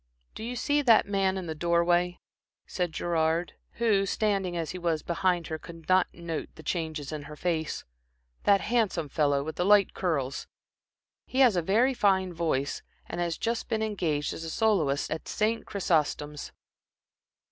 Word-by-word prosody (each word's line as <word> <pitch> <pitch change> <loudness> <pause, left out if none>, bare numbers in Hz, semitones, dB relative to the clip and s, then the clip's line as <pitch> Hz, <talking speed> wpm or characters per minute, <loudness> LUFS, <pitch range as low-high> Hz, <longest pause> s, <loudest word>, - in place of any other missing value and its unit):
"Do - - -8
you 245 +2 -4
see 290 +4 +1
that 235 -6 +5
man 195 -1 +1
in 185 - -4
the 160 - -3
door 170 +2 +2
way?" 175 0 +2 0.5
said 180 -2 -2
Gerard, 165 +1 0 0.2
who, 210 -4 +2
standing 195 -4 0
as 165 -2 -2
he 185 - -6
was 165 -3 -1
behind 175 -1 0
her 160 0 -4
could 165 -1 -12
not 185 0 +4
note 170 -2 -5
the 160 - -12
changes 160 -3 -3
in 155 -1 -4
her 150 - -8
face, 160 -1 -2 0.6
"that 200 -1 +5
handsome 210 -10 0
fellow 145 -1 +1
with 160 +2 -6
the - - +1
light 200 0 +5
curls? 140 -7 -2 0.8
He 260 - +1
has 245 -7 +6
a 175 - +2
very 225 +10 +3
fine 190 -5 +2
voice, 155 -5 -1 0.2
and - - -4
has 170 -1 -1
just 230 0 -2
been 220 -2 0
engaged 170 -9 -1
as 165 0 -6
soloist 160 -11 +1
at 160 - -4
St. 220 +2 -1
Chrysostom's." 150 -5 -1
175 Hz, 170 wpm, -28 LUFS, 160-200 Hz, 0.8 s, has